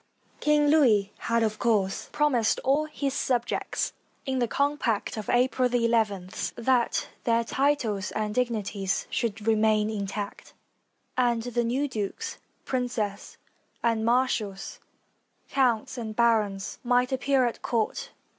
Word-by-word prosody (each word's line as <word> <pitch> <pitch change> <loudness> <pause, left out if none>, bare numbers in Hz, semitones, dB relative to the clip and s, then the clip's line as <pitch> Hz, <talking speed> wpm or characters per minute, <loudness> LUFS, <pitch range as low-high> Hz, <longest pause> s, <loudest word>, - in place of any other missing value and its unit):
King 300 0 +3
Louis 225 -10 +4
had 230 0 +1
of 215 -1 -1
course 205 -5 +1
promised 255 -7 +2
all 280 +4 +2
his 280 -3 -3
subjects, 245 -3 -1 0.3
in 265 -2 -1
the 240 - +1
compact 280 -5 0
of 215 -2 -6
April 250 +1 +2
ii, 235 -1 +2 0.7
that 240 0 +1 0.2
their 230 0 +2
titles 230 -6 0
and 215 -1 -2
dignities 210 -6 -1
should 220 -2 -2
remain 215 -1 +3
intact; 200 -1 -5 0.6
and 240 -2 +2
the 240 0 -1
new 260 +5 0
dukes, 210 -7 -4 0.3
princes 240 -6 -3 0.5
and 230 -1 +1
marshals, 230 -5 0 0.7
counts 250 -2 +1
and 220 -2 -5
barons, 215 -4 +1
might 250 +1 +2
appear 265 0 +2
at 240 - -3
court. 240 - -1
235 Hz, 120 wpm, -27 LUFS, 215-255 Hz, 0.7 s, Louis